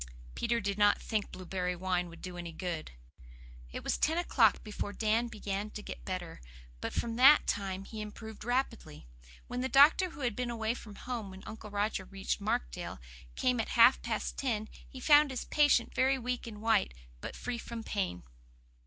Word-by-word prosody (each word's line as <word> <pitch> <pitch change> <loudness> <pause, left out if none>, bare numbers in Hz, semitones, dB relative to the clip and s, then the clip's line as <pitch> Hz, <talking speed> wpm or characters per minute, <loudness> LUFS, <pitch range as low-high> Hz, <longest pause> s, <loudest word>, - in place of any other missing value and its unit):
Peter 235 0 0
did 200 0 -2
not 205 0 +5
think 215 -3 -2
blueberry 180 0 -3
wine 180 -1 -1
would 170 - -13
be 180 -1 -6
any 175 -1 -6
good. 165 -1 -4 0.8
It - - -6
was - - -1
ten 320 +2 +2
o'clock 240 - +3
before 210 -1 -4
Dan 225 +2 +1
began 210 -2 -4
to 210 0 -8
get - - -8
better; 180 -3 -5 0.4
but - - -3
from 230 -1 -2
that 275 +4 +8
time 195 -1 -2
he 220 0 -7
improved 215 +1 -8
rapidly. 235 - -2 0.4
When 245 0 -4
the 260 - -1
doctor, 295 +7 +6
who 325 -3 -11
had 240 -5 0
been 250 -1 -2
away 225 -1 -1
from 215 -4 -10
home 235 -4 -5
when 190 0 -11
Uncle 215 -1 -8
Roger 205 -1 -1
reached 195 +2 -3
Markdale, - - -2 0.4
came 250 -1 +1
at 225 - -1
half 235 +3 +7
past 225 -2 -3
ten, 220 -5 -1 0.2
he 260 - -9
found 295 +2 +6
his 260 -2 -4
patient 290 -5 +3
very 265 +1 +3
weak 250 -1 -3
and 210 -2 -8
white, 220 - +2 0.2
but - - -7
free 245 -1 -4
from 230 -1 -6
pain. 190 - -2
220 Hz, 185 wpm, -32 LUFS, 195-245 Hz, 0.8 s, that